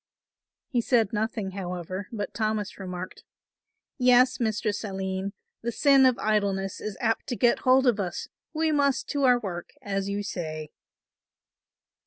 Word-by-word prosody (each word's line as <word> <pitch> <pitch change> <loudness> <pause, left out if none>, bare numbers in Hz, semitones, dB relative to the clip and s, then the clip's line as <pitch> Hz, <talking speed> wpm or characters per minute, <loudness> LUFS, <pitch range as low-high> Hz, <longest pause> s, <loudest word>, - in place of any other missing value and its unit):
He 245 -4 +1
said 230 -4 +2
nothing, 215 -2 -1
however, 185 0 -5
but 205 -3 -4
Thomas 215 -3 -2
remarked; 185 -1 -6 0.8
"Yes, 250 0 +5
Mistress 215 -2 -1
Aline, 190 -1 -3 0.3
the 235 - -2
sin 275 +1 +5
of 255 - +2
idleness 200 -3 0
is 210 -2 -5
apt 225 -3 0
to 250 - -2
get 240 0 +3
hold 260 +1 +4
of 235 -4 +3
us, 180 -3 -3 0.2
we 315 0 +1
must 280 -2 +2
to 285 -1 +1
our 250 -1 +5
work 180 -6 -5
as 195 -1 -2
you 200 +1 -2
say." 155 -6 -5
215 Hz, 145 wpm, -27 LUFS, 190-245 Hz, 0.8 s, Yes